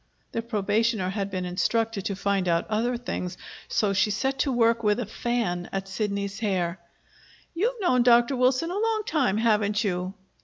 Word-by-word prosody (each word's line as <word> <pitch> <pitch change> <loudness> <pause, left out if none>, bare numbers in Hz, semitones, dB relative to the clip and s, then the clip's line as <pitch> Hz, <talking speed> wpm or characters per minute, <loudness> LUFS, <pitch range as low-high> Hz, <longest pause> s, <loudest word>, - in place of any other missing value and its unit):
The 230 - -2
probationer 215 -2 0
had 200 -1 -2
been 185 -2 -3
instructed 215 +3 0
to 200 - -1
find 195 -1 0
out 170 -1 +2
other 235 +3 0
things; 185 -7 -4 0.3
so 210 -3 +1
she 195 +2 +2
set 265 +6 -1
to 275 - +1
work 230 -1 +3
with 210 +1 +2
a 245 - -2
fan 220 -5 -2
at 195 0 -3
Sidney's 200 0 -3
hair. 185 -5 -1 0.7
"You've 455 +8 -1
known 255 -10 +3
Dr. 240 +2 +5
Wilson 255 +6 +2
a 390 - -2
long 445 -1 +1
time, 265 -10 +1
haven't 215 -1 +2
you?" 185 -1 -2
215 Hz, 175 wpm, -26 LUFS, 195-245 Hz, 0.7 s, Dr